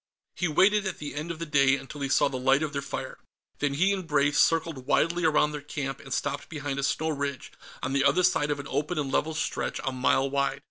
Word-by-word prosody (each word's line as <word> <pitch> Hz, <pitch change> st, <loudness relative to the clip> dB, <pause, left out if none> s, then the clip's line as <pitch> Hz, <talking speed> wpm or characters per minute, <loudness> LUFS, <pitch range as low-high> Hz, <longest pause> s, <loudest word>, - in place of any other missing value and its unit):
He 180 Hz, -, 0 dB
waited, 200 Hz, +6 st, +3 dB
at 190 Hz, -, -4 dB
the 150 Hz, -, -6 dB
end 150 Hz, +3 st, -5 dB
of 170 Hz, -, -4 dB
the 165 Hz, -, -4 dB
day, 140 Hz, -3 st, +4 dB
until 140 Hz, +2 st, -8 dB
he 140 Hz, -, -1 dB
saw -, -, +4 dB
the 130 Hz, -2 st, -4 dB
light 135 Hz, +3 st, +3 dB
of 155 Hz, -1 st, -3 dB
their 140 Hz, -, -2 dB
fire. -, -, -6 dB, 0.4 s
Then 145 Hz, -1 st, 0 dB
he 190 Hz, +7 st, +3 dB
and 190 Hz, -4 st, -4 dB
Brave 145 Hz, -1 st, +2 dB
circled 160 Hz, -5 st, +2 dB
widely 170 Hz, +2 st, +2 dB
around 150 Hz, -1 st, +3 dB
their 150 Hz, -1 st, -5 dB
camp, 140 Hz, -2 st, -4 dB
and 135 Hz, -, -12 dB
stopped 140 Hz, +2 st, -2 dB
behind 145 Hz, -3 st, -4 dB
a -, -, -2 dB
snow 160 Hz, +3 st, 0 dB
ridge, 140 Hz, -3 st, -3 dB, 0.3 s
on 130 Hz, -, -2 dB
the 140 Hz, 0 st, +2 dB
other 140 Hz, +6 st, +3 dB
side 155 Hz, -4 st, +2 dB
of 145 Hz, -1 st, -1 dB
an 140 Hz, -, -6 dB
open 150 Hz, +5 st, -2 dB
and 140 Hz, -3 st, -1 dB
level 160 Hz, +1 st, 0 dB
stretch 155 Hz, -, -2 dB
a 135 Hz, -, -1 dB
mile 130 Hz, +1 st, +2 dB
wide. 140 Hz, 0 st, -1 dB
145 Hz, 245 wpm, -27 LUFS, 140-160 Hz, 0.4 s, day